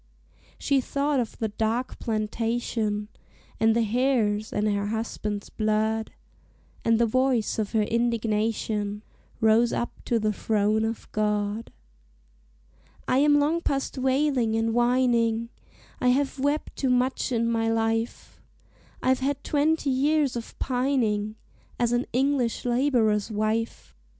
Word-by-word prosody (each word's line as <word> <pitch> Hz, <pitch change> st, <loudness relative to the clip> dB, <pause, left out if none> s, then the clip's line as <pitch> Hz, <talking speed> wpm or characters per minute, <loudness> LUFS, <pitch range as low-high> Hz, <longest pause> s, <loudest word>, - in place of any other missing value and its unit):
She 275 Hz, -2 st, +1 dB
thought 280 Hz, +2 st, 0 dB
of 235 Hz, -, -3 dB
the 220 Hz, -, -2 dB
dark 225 Hz, +4 st, -2 dB
plantation, 220 Hz, -1 st, -2 dB, 0.5 s
And 225 Hz, 0 st, +4 dB
the 235 Hz, -, +3 dB
hares, 220 Hz, -2 st, +1 dB
and 210 Hz, +1 st, 0 dB
her 205 Hz, -1 st, 0 dB
husband's 210 Hz, -2 st, -4 dB
blood, 220 Hz, 0 st, 0 dB, 0.7 s
And 230 Hz, 0 st, +3 dB
the 235 Hz, -, +3 dB
voice 255 Hz, -1 st, +1 dB
of 210 Hz, 0 st, -2 dB
her 220 Hz, -1 st, +3 dB
indignation 215 Hz, -2 st, -1 dB, 0.4 s
Rose 225 Hz, +2 st, +4 dB
up 240 Hz, -, -4 dB
to 235 Hz, -, +1 dB
the 215 Hz, -1 st, 0 dB
throne 215 Hz, +1 st, +1 dB
of 225 Hz, 0 st, -4 dB
God: 210 Hz, +1 st, -1 dB, 1.4 s
"I 255 Hz, -, +3 dB
am 290 Hz, 0 st, +5 dB
long 315 Hz, +4 st, +1 dB
past 275 Hz, -4 st, -2 dB
wailing 260 Hz, -3 st, +1 dB
and 225 Hz, 0 st, 0 dB
whining, 240 Hz, -2 st, +2 dB, 0.5 s
I 250 Hz, -, +1 dB
have 270 Hz, +2 st, +1 dB
wept 285 Hz, +3 st, -1 dB
too 265 Hz, -, 0 dB
much 250 Hz, +1 st, +1 dB
in 230 Hz, -1 st, +1 dB
my 225 Hz, -1 st, +1 dB
life: 225 Hz, 0 st, -2 dB, 0.6 s
I've 260 Hz, 0 st, +3 dB
had 275 Hz, +1 st, -2 dB
twenty 300 Hz, -1 st, +1 dB
years 280 Hz, 0 st, +2 dB
of 235 Hz, -1 st, -7 dB
pining 245 Hz, -5 st, 0 dB, 0.4 s
As 240 Hz, -1 st, +1 dB
an 240 Hz, +1 st, 0 dB
English 260 Hz, -2 st, 0 dB
laborer's 240 Hz, -5 st, +2 dB
wife. 220 Hz, +1 st, -2 dB
230 Hz, 130 wpm, -26 LUFS, 215-260 Hz, 1.4 s, am